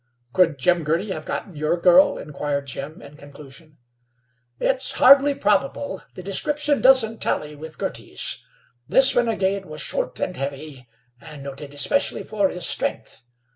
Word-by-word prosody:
"Could 165 -3 +3
Jim 175 +5 +2
Girty 170 +7 -1
have 155 -4 -5
gotten 190 - -5
your 155 +3 0
girl?" 180 +2 +5
inquired 145 -1 -4
Jim, 140 +3 -7
in 145 +1 -13
conclusion. 145 +2 -13 0.8
"It's 265 0 0
fairly 275 +2 +6
probable. 210 0 -1
The 185 - -9
description 290 +9 0
doesn't 240 -4 +4
tally 150 0 -2
with 155 +1 -9
Girty's. - - -4 0.4
This 265 0 +6
renegade 200 -5 0
was 155 0 -8
short 140 - -3
and 180 - -3
heavy, 140 -1 -7 0.3
and 150 -3 -11
noted 140 +1 -9
especially 280 - +1
for 205 -3 0
his 180 -1 -4
strength. - - -3
170 Hz, 140 wpm, -22 LUFS, 145-215 Hz, 0.8 s, fairly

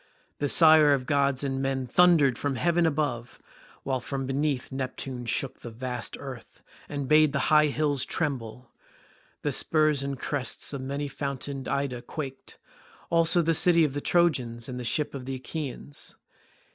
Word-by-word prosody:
The 145 - 0
sire 155 -2 +7
of 130 -2 -1
gods 140 -1 +1
and 135 -1 -2
men 135 -1 -1
thundered 155 -2 +4
from 140 +2 -2
heaven 170 +5 +2
above, 140 -6 -2 0.4
while 130 -1 -1
from 135 +2 -4
beneath 135 0 -1
Neptune 130 -1 -5
shook 135 +2 -1
the 120 - -8
vast 125 +1 -4
earth, 130 -4 -10 0.3
and 140 -2 -4
bade 155 0 +5
the 140 +2 +1
high 150 0 +6
hills 145 -2 +1
tremble. 125 -5 -3 0.7
The - - 0
spurs 155 -3 +1
and 140 -1 -4
crests 145 +1 -2
of 140 - -4
many 140 +2 -3
fountained 140 -1 -5
Ida 135 -3 -2
quaked, 135 +1 -7
as - - -25 0.5
also 165 +1 +3
the 165 +1 +2
city 170 0 +4
of 145 -4 0
the 145 - -3
Trojans 125 -11 +1
and 125 -1 -5
the - - -5
ships 150 +5 -1
of 135 -2 -7
the 135 0 -4
Achaeans. 140 +1 -6
140 Hz, 165 wpm, -27 LUFS, 130-150 Hz, 0.7 s, sire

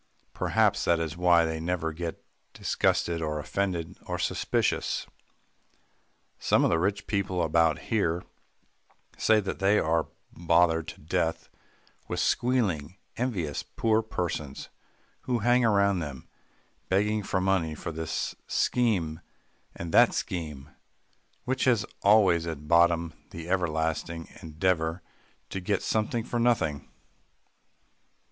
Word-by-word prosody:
Perhaps - - +2
that 85 -1 +3
is 80 -1 -3
why 85 -1 +4
they 80 0 -3
never 80 -1 -2
get 85 0 -6 0.3
disgusted 85 -1 0
or 75 -1 -2
offended 85 +1 -3
or - - -2
suspicious. - - 0 1.3
Some - - +3
of - - +3
the 80 - +2
rich 100 +3 -1
people 95 -4 -1
about 80 -1 +3 0.2
here 85 -5 +1 0.9
say 110 -1 +3
that 100 -2 -4
they 100 +2 +4
are 80 -2 +1 0.3
bothered 85 -1 +2
to - - -9
death 80 +1 -1 0.6
with - - -3
squealing, 100 - 0 0.2
envious 95 - -2
poor 110 -1 +1
persons, 85 -9 -4 0.6
who 125 -1 +1
hang 120 +1 +5
round 100 -5 +3
them, 70 -5 -7 0.6
begging 105 +3 +2
for 95 -1 -1
money 95 -4 +1
for 85 - -5
this 80 0 -3
scheme 95 -11 +1 0.6
and 85 -1 -6
that - - +6
scheme, 75 -5 -4 0.7
which 130 +1 -1
has 120 -4 +3 0.2
always 100 -5 +4
at 75 -2 -6
bottom 85 0 +3 0.2
the 85 0 -8
everlasting 80 -2 -1
endeavour 80 +1 -1 0.5
to 95 - -3
get 95 +2 -1
something 110 +1 0
for 120 +1 -3
nothing. 115 -12 +1
85 Hz, 120 wpm, -28 LUFS, 80-100 Hz, 1.3 s, that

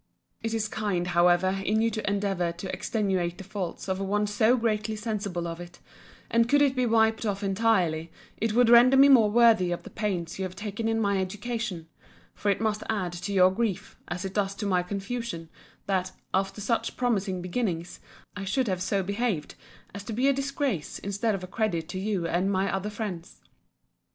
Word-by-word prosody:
It 225 0 -2
is 220 -1 0
kind, 200 -5 -2
however, 175 +2 +3
in 215 +3 +1
you 230 +1 +2
to 215 -1 -2
endeavour 195 -4 0
to 180 +2 -6
extenuate 190 -5 -1
the - - -8
faults 195 -2 -5
of 190 0 -1
one 205 +2 0
so 220 +4 +3
greatly 220 -2 0
sensible 205 -5 -3
of 165 0 -6
it: 175 0 -11 0.5
and 230 0 +3
could 290 +1 +5
it 275 -2 +2
be 250 -1 +1
wiped 220 0 +3
off 205 -2 -2
entirely, 190 -6 +1 0.3
it 225 -1 -1
would 245 +1 +5
render 245 +3 +7
me 275 +1 +8
more 235 -6 +7
worthy 220 -5 +5
of 175 - -3
the - - -11
pains 185 -5 -3
you - - -1
have 185 -1 -5
taken 210 +2 -4
in 225 0 +1
my 200 -2 +1
education: 205 -2 -4 0.5
for 205 - -2
it 200 - +2
must 215 -1 0
add 190 -6 -1
to 175 +4 -5
your 185 -1 +5
grief, 195 -2 -2
as 180 +2 -4
it 190 - -5
does 200 -1 0
to 205 - -4
my 185 -3 +2
confusion, 195 -2 -5 0.4
that, 185 -1 -1 0.2
after 195 +2 -1
such 230 +3 -1
promising 200 -7 0
beginnings, 180 -2 -3 0.4
I 200 - -5
should 235 +6 0
have 185 -2 -1
so 195 +1 0
behaved 200 -5 -2 0.4
as 200 +1 -7
to 225 - -5
be 250 +5 +2
a 275 - +5
disgrace 275 - -2
instead 200 +2 -1
of 185 - -6
a - - -6
credit 180 -5 -1
to 185 - -4
you 195 -3 -1
and 180 +4 +1
my 190 0 0
other 195 +2 -2
friends. 205 -6 -6
200 Hz, 195 wpm, -27 LUFS, 185-225 Hz, 0.5 s, me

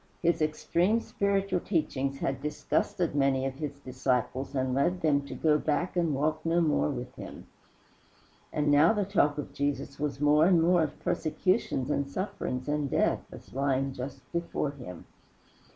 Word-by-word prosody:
His 170 -1 +2
extreme 170 +7 +1
spiritual 195 -4 0
teachings 140 -7 -1
had 135 0 -1
disgusted 150 +3 -1
many 135 -2 +2
of 135 +1 -4
his 145 -2 -5
disciples 130 +1 -1
and 130 -1 0
led 170 +7 +1
them 145 -3 +3
to - - -6
go 150 -1 +3
back 160 +5 -1
and 165 -5 +1
walk 150 +3 0
no 165 +1 +2
more 150 - +2
with - - -5
him. - - -9 1.1
And 150 -1 +1
now 150 +7 +6
the 205 -2 0
talk 160 -7 +2
of 145 -1 -5
Jesus 140 -1 -2
was 145 -2 -2
more 150 +2 +5
and 180 -3 +5
more 175 +1 +4
of 150 -2 -2
persecutions 160 - 0
and 140 -1 0
sufferings 135 -7 -3
and 145 -1 0
death, - - +1
as - - -12
lying 135 0 0
just 130 +2 -6
before 170 -4 -2
him. 120 - -10
150 Hz, 165 wpm, -29 LUFS, 135-170 Hz, 1.1 s, now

